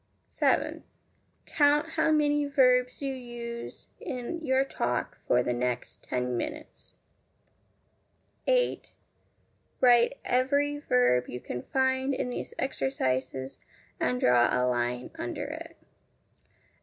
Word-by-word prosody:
7. - - 0 0.6
Count 295 +1 +3
how 320 0 +1
many 295 -1 +2
verbs 250 -1 +3
you 275 -1 -1
use 240 -2 -7
in 265 +7 -5
your 265 -1 +2
talk 125 - -2
for 125 0 +3
the 125 - 0
next 125 0 -3
ten 125 0 -2
minutes. 305 - -6 1.5
8. - - +1 0.8
Write 245 +1 +5
every 285 +3 +1
verb 125 - +3
you 125 - -5
can 125 0 -5
find 260 - 0
in 250 - -2
these - - -6
exercises, 130 - -2 0.4
and 125 0 0
draw 120 -1 +5
a 125 0 +1
line 125 0 -1
under - - -4
it. - - -8
245 Hz, 110 wpm, -28 LUFS, -, 1.5 s, Write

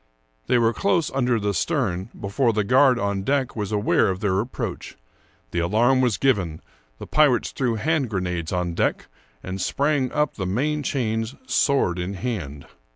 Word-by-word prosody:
They - - +3
were 115 -1 +3
close 190 -2 +1
under 125 -3 +1
the 100 -1 -1
stern 100 - -1
before 115 +5 0
the 105 0 +1
guard 130 +4 +4
on 100 -3 -1
deck 135 +4 0
was 105 -3 -3
aware 105 -1 +2
of 95 -1 -2
their 95 -2 +1
approach. 120 +5 -5 0.5
The 85 - -1
alarm 115 +9 +3
was 120 -7 +1
given; 95 -12 +1 0.4
the - - -8
pirates 145 -6 +3
threw 125 -4 -1
hand 150 +2 0
grenades 90 -5 -3
on 90 -1 -1
deck, - - -1 0.3
and 95 +1 -5
sprang 140 +4 0
up 150 0 0
the 95 -3 -2
main 145 +10 0
chains,^ 115 -4 -2
sword 135 - +2
in 90 +3 -3
hand. 90 - -5
110 Hz, 165 wpm, -23 LUFS, 95-135 Hz, 0.5 s, guard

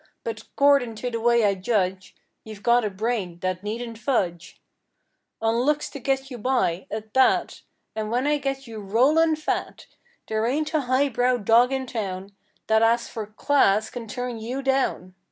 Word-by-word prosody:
But 225 -1 -5
'cordin' 280 -5 +3
to 245 +3 -4
the 230 - -2
way 235 -1 +4
I 200 - +3
judge 190 -1 -1 0.3
You've 215 -2 -11
got 240 0 +4
a 210 - 0
brain 200 -3 -3
that 185 -1 -2
needn't 225 +2 -5
fudge 185 -9 -2 0.8
On 225 0 +1
looks 295 +4 0
to 280 - -7
get 270 +1 -1
you 245 - -6
by, 205 -7 0
at 215 0 -6
that, 260 0 +2 0.3
And 215 -1 -3
when 245 +4 0
I 295 0 +2
get 270 -1 -3
you 225 -2 -8
rollin' 280 +11 +3
fat 310 - -3 0.4
There 220 +1 0
ain't 305 +5 -1
a 310 - +2
high 260 +2 +1
brow 245 0 +1
dog 235 +3 +4
in 265 -1 -1
town 195 -5 -5 0.3
That 220 0 +3
as 235 +1 +2
for 220 -2 -6
"class" 215 -2 +2
can 235 -2 -7
turn 245 +1 -4
you 250 +5 -4
down! 265 -9 0
235 Hz, 175 wpm, -24 LUFS, 215-265 Hz, 0.8 s, way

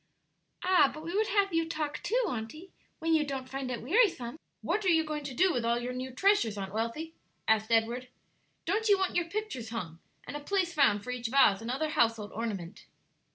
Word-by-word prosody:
"Ah, 365 -6 +5
but 310 - -9
we 340 +3 -4
would 435 +1 +2
have 395 -2 +2
you 330 0 +1
talk, 305 -2 -3
too, - - +1
auntie, 250 +10 -6 0.3
when 325 0 0
you 315 -1 +4
don't 270 -3 -4
find 270 0 -4
it 240 -3 -4
wearisome!" 315 - +2 0.2
"What 425 - 0
are - - -1
you 325 -2 +4
going 305 -1 -4
to 270 -3 -5
do 370 +3 +4
with 245 - -1
all 235 +1 +2
your 245 +1 -3
new 255 +1 -4
treasures, 260 - +2
Aunt 195 -1 -5
Wealthy?" 230 +9 -3 0.3
asked 220 0 +2
Edward; 235 +3 +1 0.6
"don't 430 +5 0
you 400 - +6
want 380 -1 -1
your 350 - +2
pictures 410 - -4
hung 175 -8 -5 0.3
and - - -7
a - - -3
place 360 +2 0
found 275 -10 +3
for 250 - -5
each 245 -1 -3
vase 225 -5 +4
and 225 - -6
other 305 +5 -1
household 230 -6 +1
ornament?" 205 -5 -5
275 Hz, 210 wpm, -30 LUFS, 230-345 Hz, 0.6 s, you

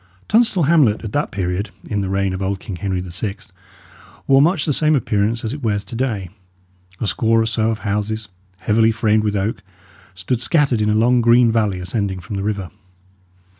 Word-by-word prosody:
Tunstall 220 -5 +3
hamlet 140 -9 +3
at 110 - -6
that 145 - 0
period, 95 +2 -2 0.2
in 105 -2 -1
the 95 - -3
reign 95 -1 0
of 95 - -5
old 95 0 -2
King 95 -2 -7
Henry 95 -1 -2
VI., 95 +3 -5 0.9
wore 135 0 +5
much 165 +1 +2
the 150 - +1
same 155 +2 +2
appearance 110 -2 0
as 110 +1 -3
it 145 - -7
wears 105 -4 -1
to 100 - -9
day. 110 -8 -2 0.7
A - - -2
score 115 +2 +2
or 110 - +2
so 110 0 0
of 110 - -1
houses, 105 +1 -2 0.3
heavily 110 +4 +2
framed 110 -1 +1
with 105 -1 -1
oak, 100 +2 -2 0.5
stood 110 +7 -2
scattered 140 -7 +2
in 105 - +1
a 105 - +2
long 120 +3 +3
green 120 0 +5
valley 105 -5 0
ascending 95 +1 -2
from 90 +4 -7
the 95 - -2
river. 100 -3 -3
110 Hz, 195 wpm, -19 LUFS, 100-120 Hz, 0.9 s, wore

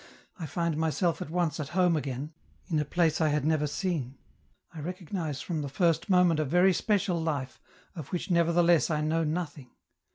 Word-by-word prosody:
I 160 - -4
find 170 0 -1
myself 160 +1 0
at - - -5
once 170 -2 -1
at 145 -2 -4
home 180 -2 +4
again, 145 +1 -4 0.3
in 160 -5 0
a 150 - 0
place 165 -1 +1
I 160 - +4
had 150 -1 0
never 155 -1 +2
seen; 145 -5 -3 0.6
I 160 - -8
recognize 170 -2 -4
from 165 -4 -3
the 140 - -4
first 165 +6 +1
moment 180 -4 +4
a - - +2
very 180 +6 +4
special 190 -2 0
life, 140 -5 -3 0.3
of 155 -6 -7
which 180 +3 -4
nevertheless 170 -1 +3
I 155 -2 0
know 160 +2 +1
nothing. 150 -5 -4
160 Hz, 185 wpm, -28 LUFS, 150-175 Hz, 0.6 s, home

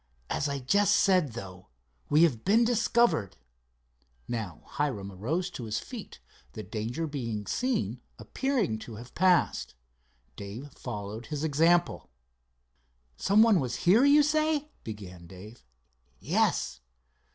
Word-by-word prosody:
As 145 - 0
I 140 - -2
just 200 +11 +3
said, 180 - +3
though, 95 -5 -9 0.4
we 150 +3 +5
have 130 -10 +2
been 225 +5 +4
discovered." 230 - +2 0.9
Now 110 -9 -5
Hiram 125 -10 -3
arose 160 - -2
to 125 -8 -7
his 110 0 -2
feet, - - -8 0.3
the 110 - -7
danger 115 +9 -4
of 160 - -4
being 115 -7 -4
seen 255 - -1 0.2
appearing 250 - -1
to 110 0 -9
have 120 +3 -11
passed. 180 - +2 0.6
Dave 110 - -8
followed 105 0 -7
his 150 0 -4
example. 165 +3 +2 1.1
"Some 200 - +4
one 220 -5 +5
was 125 -4 -2
here, 205 +9 +6
you 290 +1 +6
say?" 305 0 0
began 90 -6 -9
Dave. 100 +6 -12 0.6
"Yes." 65 - 0
140 Hz, 130 wpm, -28 LUFS, -, 1.1 s, here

